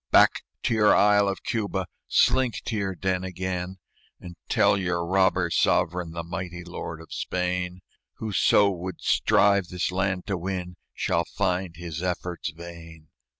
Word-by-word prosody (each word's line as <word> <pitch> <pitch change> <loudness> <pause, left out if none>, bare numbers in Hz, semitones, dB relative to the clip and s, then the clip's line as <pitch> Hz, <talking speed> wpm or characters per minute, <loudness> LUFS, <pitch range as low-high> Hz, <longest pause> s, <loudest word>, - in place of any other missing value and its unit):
"Back - - +5 0.2
to - - +1
your 105 -2 +5
isle 105 0 +5
of 100 - -3
Cuba! 100 -5 -1 0.2
Slink 130 -5 +3
to 115 - -2
your 95 -3 -2
den 95 0 -1
again, 95 0 -3 0.4
And 90 -1 -10
tell - - +4
your 90 -3 -1
robber 95 -1 +2
sovereign, 90 +1 +2
The 85 0 -4
mighty 85 0 -5
lord 85 -2 -6
of 80 - -11
Spain, 90 0 -2 0.3
Whoso 105 -1 +3
would 90 -1 -6
strive 100 -2 +3
this 90 0 -2
land 95 0 -1
to 95 -3 -2
win 90 0 -4 0.2
Shall 85 0 0
find 90 -3 0
his 85 -1 -6
efforts 90 -2 -3
vain. 85 -1 -11
90 Hz, 150 wpm, -26 LUFS, 85-95 Hz, 0.4 s, Back